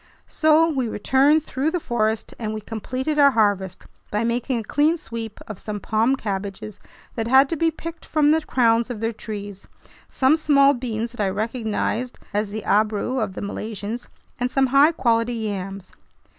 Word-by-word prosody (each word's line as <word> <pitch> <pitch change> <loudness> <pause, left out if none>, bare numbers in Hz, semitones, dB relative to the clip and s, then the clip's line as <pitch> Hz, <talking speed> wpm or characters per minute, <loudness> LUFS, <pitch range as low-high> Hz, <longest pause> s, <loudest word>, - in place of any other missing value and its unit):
So 315 +1 +4
we 270 -7 -1
returned 275 +8 +3
through 275 +1 -1
the 355 - -1
forest, 220 -6 -1
and 215 -2 -3
we 215 - -5
completed 255 +8 -3
our 280 -1 +8
harvest 205 -6 0 0.3
by 210 +2 -1
making 240 +2 -1
a 225 - -3
clean 295 +9 +2
sweep 225 -6 -7
of 215 -4 -7
some 210 -1 -5
palm 225 +6 +1
cabbages 200 -2 -5 0.3
that 225 -1 -3
had 265 +3 +6
to - - -1
be 330 +1 +2
picked 330 +1 -8
from 300 -2 +2
the 320 +1 +3
crowns 235 -4 +2
of 240 -4 -5
their 225 +1 -1
trees, 205 -3 -8 0.4
some 265 +3 +3
small 280 -3 +4
beans 235 -3 -3
that 240 - -6
I 195 - +1
recognized 225 +3 -2 0.2
as 205 0 0
the 215 0 -5
"abrou" 215 +4 +1
of 190 - -3
the - - -5
Malaysians, 210 +2 -5 0.3
and 245 0 0
some 270 +1 +2
high 285 +3 +6
quality 235 -5 +1
yams. 195 -3 -5
230 Hz, 175 wpm, -23 LUFS, 215-270 Hz, 0.4 s, our